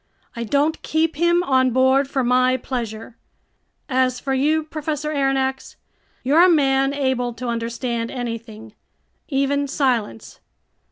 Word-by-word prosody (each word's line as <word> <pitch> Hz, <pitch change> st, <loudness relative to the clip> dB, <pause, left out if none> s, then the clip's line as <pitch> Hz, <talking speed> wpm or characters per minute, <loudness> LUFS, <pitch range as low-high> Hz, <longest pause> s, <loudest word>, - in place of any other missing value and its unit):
I 235 Hz, -, -4 dB
don't 290 Hz, +7 st, 0 dB
keep 315 Hz, -1 st, 0 dB
him 345 Hz, +2 st, +3 dB
on 260 Hz, -5 st, +2 dB
board 260 Hz, +2 st, +3 dB
for 270 Hz, -2 st, -1 dB
my 255 Hz, +1 st, +3 dB
pleasure! 230 Hz, -3 st, -6 dB, 0.7 s
As 255 Hz, -2 st, +1 dB
for 270 Hz, -, -2 dB
you, 305 Hz, +4 st, +1 dB
Professor 305 Hz, -1 st, -4 dB
Aronnax, 270 Hz, -2 st, -1 dB, 0.5 s
you're 295 Hz, +7 st, +5 dB
a 370 Hz, -, +6 dB
man 270 Hz, -4 st, +3 dB
able 260 Hz, -4 st, -1 dB
to 250 Hz, +2 st, -6 dB
understand 235 Hz, 0 st, -3 dB
anything, 230 Hz, -3 st, -7 dB, 0.6 s
even 280 Hz, 0 st, 0 dB
silence. 245 Hz, -, -2 dB
265 Hz, 125 wpm, -21 LUFS, 245-285 Hz, 0.7 s, a